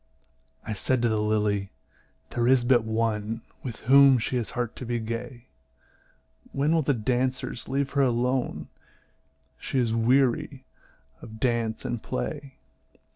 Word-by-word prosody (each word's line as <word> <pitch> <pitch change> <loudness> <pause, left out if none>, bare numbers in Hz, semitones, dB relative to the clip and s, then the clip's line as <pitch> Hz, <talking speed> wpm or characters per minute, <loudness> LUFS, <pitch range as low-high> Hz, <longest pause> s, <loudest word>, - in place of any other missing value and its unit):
I 110 - -3
said 120 +4 0
to 120 - +3
the 110 -1 0
lily, 105 -2 0 0.6
"There 120 0 0
is 130 -1 +4
but 120 -2 +4
one 110 0 -1 0.2
With 120 -4 -7
whom 135 +2 +7
she 120 +2 -2
has 120 - -2
heart 120 -2 -2
to 125 - -6
be 120 0 -1
gay. 115 +2 -5 1.1
When 145 +4 +1
will 165 - +3
the 145 -2 +1
dancers 125 +2 -2
leave 135 +1 -1
her 140 - +2
alone? 125 0 0 0.9
She - - -3
is 120 -3 +1
weary 130 +4 +1 0.6
of 110 0 -11
dance 115 -3 -1
and 120 -2 -3
play." 130 - -5
120 Hz, 140 wpm, -26 LUFS, 110-130 Hz, 1.1 s, whom